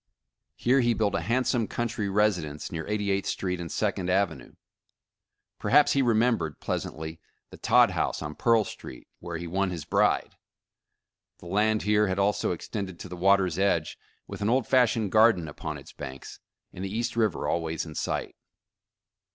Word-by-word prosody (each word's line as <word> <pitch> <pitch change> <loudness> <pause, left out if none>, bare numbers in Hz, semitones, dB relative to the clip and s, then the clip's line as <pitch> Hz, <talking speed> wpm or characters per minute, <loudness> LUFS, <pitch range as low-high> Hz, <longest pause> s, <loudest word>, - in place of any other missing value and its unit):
Here 130 +3 +2
he 120 -2 +2
built 105 -3 0
a - - +1
hand 120 +8 0
some 115 -4 +1
countrj^ 110 -4 -2
residence, 90 -8 0
near 80 -1 -4
88th 100 -2 -1
Street 90 -2 -2
and 85 - -6
Second 95 -4 -1
Avenue. 100 +2 -1 1.0
Perhaps 145 +2 +4
he 140 - +3
remembered, 115 - +1
pleasantly, 80 +1 -4 0.3
the - - -11
Todd - - +4
House - - -1
on 75 0 -5
Pearl 115 +3 +3
Street, 65 - -10
where 85 -1 -5
he 85 - -6
won 95 +3 0
his 85 -4 -5
bride. - - +1 1.0
The - - -16
land 105 +4 +1
here 105 0 +3
had 95 0 -1
also 100 +1 +1
extended 95 +1 -5
to 90 - -8
the 90 - -6
water's 95 -1 +2
edge, 85 -6 0 0.3
with - - -9
an 105 - +1
old 125 0 +2
fashioned 115 -5 +2
garden 110 -7 +4
upon 75 - -6
its - - -13
banks, 65 0 -9 0.3
and 90 - -7
the 95 - -3
East 115 +4 -2
River 110 -8 0
always 80 -1 -1
in 80 - -9
sight. - - -3
100 Hz, 170 wpm, -27 LUFS, 85-110 Hz, 1.0 s, Perhaps